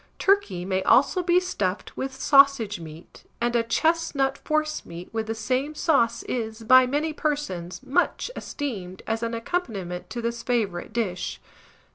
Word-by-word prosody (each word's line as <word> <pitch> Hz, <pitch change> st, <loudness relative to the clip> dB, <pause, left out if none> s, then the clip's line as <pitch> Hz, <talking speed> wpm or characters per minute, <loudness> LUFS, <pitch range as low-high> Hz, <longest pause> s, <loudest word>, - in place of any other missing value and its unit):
Turkey 300 Hz, -, +2 dB
may 190 Hz, 0 st, 0 dB
also 275 Hz, -, +4 dB
be 350 Hz, 0 st, +4 dB
stuffed 205 Hz, -, -3 dB
with 265 Hz, 0 st, -5 dB
sausage 275 Hz, -8 st, +5 dB
meat, 160 Hz, 0 st, -12 dB
and 240 Hz, 0 st, 0 dB
a 235 Hz, -, +4 dB
chestnut 280 Hz, +2 st, +1 dB
forcemeat 305 Hz, -, -3 dB
with 220 Hz, -1 st, -2 dB
the 225 Hz, -, -2 dB
same 260 Hz, +6 st, -1 dB
sauce 235 Hz, -8 st, +2 dB
is, 225 Hz, -2 st, -4 dB
by 255 Hz, +2 st, +7 dB
many 300 Hz, +4 st, -1 dB
persons, 280 Hz, -, -3 dB
much 345 Hz, -, 0 dB
esteemed 190 Hz, -10 st, -5 dB
as 225 Hz, 0 st, -2 dB
an 230 Hz, 0 st, -2 dB
accompaniment 220 Hz, -, -3 dB
to 240 Hz, -, -5 dB
this 235 Hz, 0 st, -3 dB
favourite 220 Hz, -8 st, -1 dB
dish. 210 Hz, -6 st, -2 dB
235 Hz, 145 wpm, -25 LUFS, 205-290 Hz, -, by